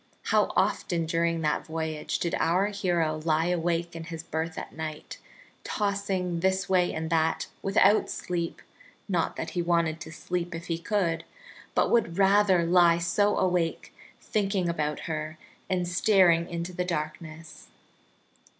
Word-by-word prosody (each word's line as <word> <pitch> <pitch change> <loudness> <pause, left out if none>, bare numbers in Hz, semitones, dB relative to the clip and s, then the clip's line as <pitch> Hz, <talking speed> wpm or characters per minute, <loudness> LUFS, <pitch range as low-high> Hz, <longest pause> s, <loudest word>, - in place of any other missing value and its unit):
How - - +2
often 170 -3 +1
during 165 0 0
that 150 +2 -1
voyage 160 -1 -3
did 170 - -2
our 185 +5 +2
hero 175 -6 0
lie 160 +1 +2
awake 170 0 -1
in 165 -1 -6
his 165 -1 -7
berth 160 0 -4
at - - -6
night, 155 -1 -6 0.4
tossing 195 -4 -1
this 190 +2 +1
way 185 -2 +2
and 160 0 -4
that 160 0 +1 0.2
without 195 +1 +3
sleep 170 -2 -4 0.4
not 180 -5 0
that 160 - -4
he 175 - -1
wanted 170 -2 +1
to 160 - -8
sleep 175 +2 -4
if 165 +1 -7
he 165 -1 -2
could, 170 -4 0 0.5
but - - +2
would 195 -8 +2
rather 195 -3 +4
lie 170 -1 +5
so 175 +5 +1
awake 180 -3 0 0.3
thinking 195 -3 -1
about 150 -3 -2
her 155 -1 -4 0.3
and 180 -1 0
staring 180 -2 +4
into 170 +1 -4
the 180 - -1
darkness! 160 -1 -6
170 Hz, 145 wpm, -27 LUFS, 165-185 Hz, 0.5 s, lie